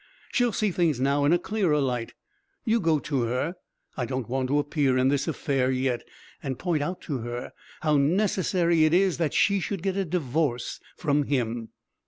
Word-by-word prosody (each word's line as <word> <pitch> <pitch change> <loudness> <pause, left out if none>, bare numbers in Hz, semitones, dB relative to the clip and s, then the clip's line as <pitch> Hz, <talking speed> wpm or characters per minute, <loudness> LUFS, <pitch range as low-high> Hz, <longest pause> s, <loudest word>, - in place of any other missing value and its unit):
She'll 245 -2 +2
see 210 -1 0
things 165 -7 +1
now 140 +2 +2
in 145 - +4
a 175 - +5
clearer 180 -5 +1
light. 125 -4 -2 0.5
You 230 0 +3
go 165 -5 +2
to 140 -2 -1
her 125 +8 -1 0.4
I 125 - -2
don't 130 -2 -3
want 130 +1 -1
to 140 +3 +1
appear 145 -3 +1
in 130 +1 +3
this 140 +1 0
affair 135 -5 0
yet 130 -2 0 0.4
and 135 -3 -3
point 170 -5 0
out 180 +5 -3
to 140 -5 -3
her 120 +1 -5 0.3
how 155 -2 +3
necessary 170 0 +2
it 155 +2 +3
is 185 -2 +2
that 160 -4 0
she 200 -1 +3
should 190 -1 -4
get 195 -1 0
a 195 - +1
divorce 150 -6 -1 0.2
from 145 -3 +1
him...." 120 -4 -1
145 Hz, 190 wpm, -26 LUFS, 130-175 Hz, 0.5 s, a